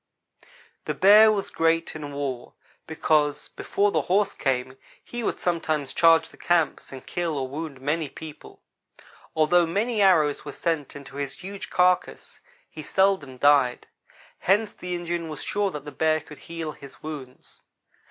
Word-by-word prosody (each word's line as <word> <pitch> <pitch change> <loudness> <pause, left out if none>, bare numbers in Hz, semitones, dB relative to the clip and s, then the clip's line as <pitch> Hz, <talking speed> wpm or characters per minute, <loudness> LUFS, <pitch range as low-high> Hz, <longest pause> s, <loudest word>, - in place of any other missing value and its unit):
The - - -2
bear 215 +3 +7
was 200 -2 -2
great 165 0 +1
in 150 -2 -6
war, 140 -3 -5 0.3
because 155 -2 +1
before 205 0 0
the - - +1
horse 200 +3 +1
came, 130 -1 -2 0.3
he 240 - -6
would - - -2
sometimes 155 -5 -1
charge 165 -1 +5
the - - -18
camps 170 -4 0
and 130 -1 -10
kill 170 -4 -2
or 130 -1 -2
wound 145 0 -6
many 150 +2 -1
people. 155 +1 -11 0.7
Although 165 +2 +4
many 210 +6 0
arrows 155 -7 +4
were 145 - -7
sent 160 -5 -2
into 140 -1 -10
his 140 -1 -3
huge 195 +1 -7
carcass, 180 0 +1 0.3
he 155 - -9
seldom 175 -6 +1
died. 140 -2 +3 0.5
Hence 205 +3 +2
the 180 0 -5
Indian 170 -1 -3
was 155 -3 -6
sure 205 -1 0
that 150 -5 -7
the 145 - -7
bear 155 0 +1
could 150 -1 -13
heal 165 -2 -6
his 140 -2 -14
wounds. 140 -5 -9
160 Hz, 155 wpm, -25 LUFS, 145-180 Hz, 0.7 s, bear